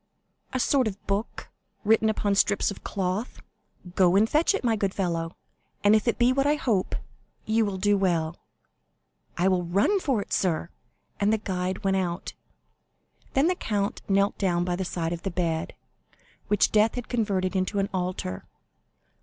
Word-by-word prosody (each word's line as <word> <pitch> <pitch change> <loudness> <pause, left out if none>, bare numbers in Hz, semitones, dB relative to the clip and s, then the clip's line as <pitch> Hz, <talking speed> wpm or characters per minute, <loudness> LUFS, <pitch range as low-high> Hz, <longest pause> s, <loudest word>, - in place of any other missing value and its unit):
"A 255 - -1
sort 260 -1 +2
of 200 -1 -6
book, 200 +3 -3 0.3
written 220 +1 +4
upon 205 -2 0
strips 200 +1 +2
of 200 - -10
cloth." 195 +4 -3 0.5
"Go 180 -1 +4
and 210 +3 +5
fetch 315 - +2
it, - - -3
my 230 -2 +2
good 195 -2 -1
fellow; 170 -3 -2 0.5
and 205 +1 +6
if 215 +2 +1
it 235 - +2
be 245 +1 +4
what 275 +1 +1
I 295 - +3
hope, 225 -10 0 0.5
you 220 0 +2
will 195 -2 -3
do 205 +2 +2
well." 170 -4 0 1.0
"I 180 +2 +2
will 185 -2 +2
run 200 - +2
for 270 - 0
it, 200 - -5
sir;" 170 -2 0 0.5
and 205 +1 +2
the 220 - +3
guide 185 -1 -3
went 195 0 +2
out. 175 -1 -3 1.0
Then 270 +2 +4
the 360 - +3
count 205 - -2
knelt 200 +1 +2
down 175 -3 +1
by 180 -1 -1
the 190 +1 -3
side 170 -1 -2
of 170 - -6
the 195 - -2
bed, 165 -3 -2 0.7
which 205 - +3
death 215 +1 +3
had 245 -2 -5
converted 200 -5 -1
into 190 +2 0
an 195 0 +1
altar. 180 - -3
200 Hz, 175 wpm, -26 LUFS, 180-220 Hz, 1.0 s, and